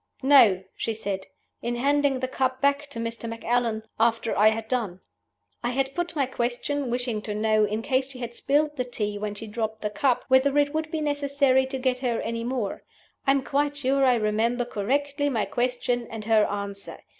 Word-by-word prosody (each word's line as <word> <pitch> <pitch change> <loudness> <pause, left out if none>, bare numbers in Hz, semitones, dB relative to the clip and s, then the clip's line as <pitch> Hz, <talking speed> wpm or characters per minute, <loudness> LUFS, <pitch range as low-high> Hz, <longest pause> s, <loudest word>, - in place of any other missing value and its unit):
'No,' 230 -9 +6
she 225 - -2
said; 195 -3 -4 0.3
'in 240 +1 -2
handing 280 +1 +2
the 255 - 0
cup 260 0 -1
back 280 +1 +2
to 280 - -9
Mr. 230 0 -4
Macallan, 230 -1 -1 0.2
after 230 0 +2
I 210 - +5
had 220 0 -3
done.' 220 -7 -2 0.6
I 240 - 0
had 270 +2 -1
put 350 0 -3
my 280 -3 +2
question, 255 +2 -2
wishing 240 -3 -1
to 210 -1 -4
know, 215 0 +3
in 215 +2 -3
case 265 0 0
she 270 - -10
had 240 -1 -5
spilled 295 +4 +1
the 250 - +1
tea 210 -4 -3
when 210 0 -3
she 225 - -7
dropped 220 0 -4
the 210 - -1
cup, 255 +2 +1
whether 270 +2 +4
it 290 0 +3
would 315 0 -2
be 320 -1 -2
necessary 280 -3 +2
to 265 0 -4
get 255 -1 0
her 245 -3 0
any 230 0 -3
more. 240 -4 -2 0.5
I - - +7
am 275 -1 0
quite 285 +3 0
sure 275 0 +1
I 255 -2 +5
remember 230 +2 +1
correctly 280 +6 -1
my 225 -6 0
question 245 -1 -1
and 220 -2 -7
her 220 -1 +4
answer. 200 -1 -5
245 Hz, 200 wpm, -26 LUFS, 220-275 Hz, 0.6 s, I